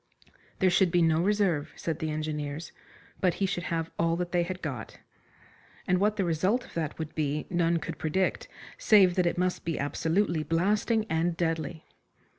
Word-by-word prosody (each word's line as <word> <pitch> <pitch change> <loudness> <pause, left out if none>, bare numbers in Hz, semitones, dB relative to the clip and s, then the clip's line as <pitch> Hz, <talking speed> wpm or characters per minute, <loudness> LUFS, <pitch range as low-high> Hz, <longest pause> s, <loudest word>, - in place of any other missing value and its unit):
There 185 -1 +3
should 190 0 +4
be 175 0 +3
no 160 0 +3
reserve, 190 -6 +1
said 165 -1 -3
the 160 -2 -2
engineers, 150 0 -4 0.5
but 180 -3 +2
he 200 - 0
should 180 -2 -2
have 165 -1 -2
all 165 0 +2
that 175 0 -3
they 175 - +2
had 180 +1 -4
got. 130 -9 -5 0.9
And 180 0 +2
what 210 +2 +2
the 195 -3 0
result 185 +9 +1
of - - -16
that 160 -3 -3
would 160 -1 -5
be 150 -1 -1
none 170 -1 +2
could - - -6
predict, 185 +4 0 0.3
save 195 -4 +6
that 180 -1 +2
it 170 - -1
must 180 0 0
be 165 -1 -2
absolutely 165 +4 0
blasting 210 +7 +1
and 165 +1 0
deadly. 165 -1 -2
170 Hz, 180 wpm, -28 LUFS, 160-185 Hz, 0.9 s, save